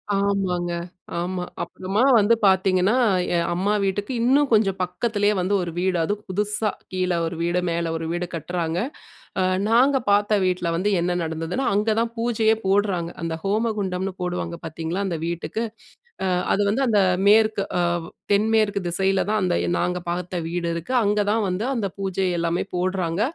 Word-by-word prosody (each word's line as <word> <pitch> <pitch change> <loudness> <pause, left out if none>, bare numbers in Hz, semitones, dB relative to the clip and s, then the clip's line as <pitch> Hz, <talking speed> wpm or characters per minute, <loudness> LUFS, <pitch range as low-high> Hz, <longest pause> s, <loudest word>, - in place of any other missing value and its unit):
ஆமாங்க. 190 -3 0 0.5
ஆமா. 180 +1 -2 0.2
அப்புறமா 195 +4 -2 0.2
வந்து 215 +1 +4
பாத்தீங்கன்னா, 190 +2 +3 0.4
என் 170 0 +1
அம்மா 195 +4 0
வீட்டுக்கு 200 +3 -1
இன்னும் 275 +4 +3
கொஞ்சம் 195 -3 +3
பக்கத்திலேயே 205 +3 0
வந்து 185 +3 0
ஒரு 175 -1 -3
வீடு 180 0 +1
அதுவும் 205 +5 -2
புதுசா 210 +2 0 0.2
கீழ 185 0 0 0.2
ஒரு 165 +1 -4
வீடு, 175 +1 +1
மேல 170 -1 -1
ஒரு 165 0 -3
வீடு 175 +1 -2
கட்றாங்க. 170 +1 -2 0.6
அ - - +3 0.3
நாங்க 255 +5 +4
பாத்த 205 +1 +3
வீட்ல 180 -2 0
வந்து 200 +5 +1
என்ன 175 +1 0
நடந்ததுனா, 165 +9 -3
அங்க 215 +2 +2
தான் 230 0 -1
பூஜையே 225 -1 +2
போட்றாங்க. 190 -4 +1
அந்த 165 -1 -2
ஹோமகுண்டம்னு 195 -3 -1
போடுவாங்க 180 -1 -3
பார்த்தீங்களா, 165 +4 -3
அந்த 170 -4 -2
வீட்டுக்கு. 170 +6 -3 0.6
அ - - +1 0.3
அது - - 0
வந்து 265 +6 +1
அந்த 210 -3 +4 0.3
மேற்கு. 215 -1 +4 0.2
அ - - +2 0.5
தென்மேற்கு 215 0 +2
திசையில 190 +2 +1
தான் 215 -1 +2
அந்த 180 -1 +1 0.2
நாங்க 180 0 0
பாத்த 180 +1 -3
வீடு 170 0 -2
இருக்கு. 170 +9 -5
அங்க 210 +1 +2
தான் 220 0 +1
வந்து 185 +4 -2
அந்த 225 -5 -1
பூஜை 195 -1 -1
எல்லாமே 170 +1 0
போட்றாங்க. 180 -1 -1
190 Hz, 155 wpm, -23 LUFS, 175-210 Hz, 0.6 s, வந்து